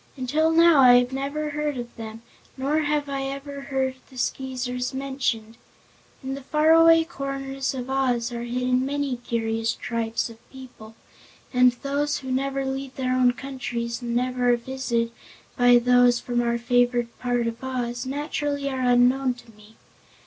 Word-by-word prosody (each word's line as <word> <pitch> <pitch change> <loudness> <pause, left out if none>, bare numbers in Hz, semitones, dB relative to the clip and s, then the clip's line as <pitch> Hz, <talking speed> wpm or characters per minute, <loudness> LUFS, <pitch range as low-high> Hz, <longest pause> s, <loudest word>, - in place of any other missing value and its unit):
"Until 295 +5 +1
now 330 -2 +6
I 245 -1 +7
never 280 +3 -3
have 300 -1 -4
heard 295 -2 -2
of 240 -1 -7
them, 225 0 -8 0.3
nor 280 +4 0
have 295 -1 0
I 275 -1 -3
ever 275 +1 -6
heard 265 -1 -2
the 260 - -14
Skeezers 250 -1 -3
mentioned. 255 -5 -3 0.7
In 265 +1 -3
the 275 - -6
faraway 325 +3 +5
corners 275 -3 -4
of 250 -1 -5
Oz 250 -3 0
are 235 -1 -4
hidden 250 +1 0
many 280 -1 -2
curious 225 -1 -2
tribes 230 -1 -2
of 230 -1 -15
people, 245 -4 -12 0.6
and 250 0 +5
those 290 +1 0
who 265 -1 -6
never 275 +1 -1
leave 265 0 -4
their 255 -1 -1
own 250 -1 +4
countries 245 -2 -5
and 235 -1 -3
never 250 0 +1
are - - +2
visited 235 -2 -2 0.4
by 245 0 +6
those 245 0 +4
from 240 -1 -1
our 235 0 0
favored 245 0 +1
part 245 -1 0
of 230 +2 -4
Oz, 245 -2 -3
naturally 285 +1 -2
are 260 -1 -3
unknown 250 +1 +3
to 245 -1 -16
me. 215 0 -19
255 Hz, 160 wpm, -24 LUFS, 240-275 Hz, 0.7 s, I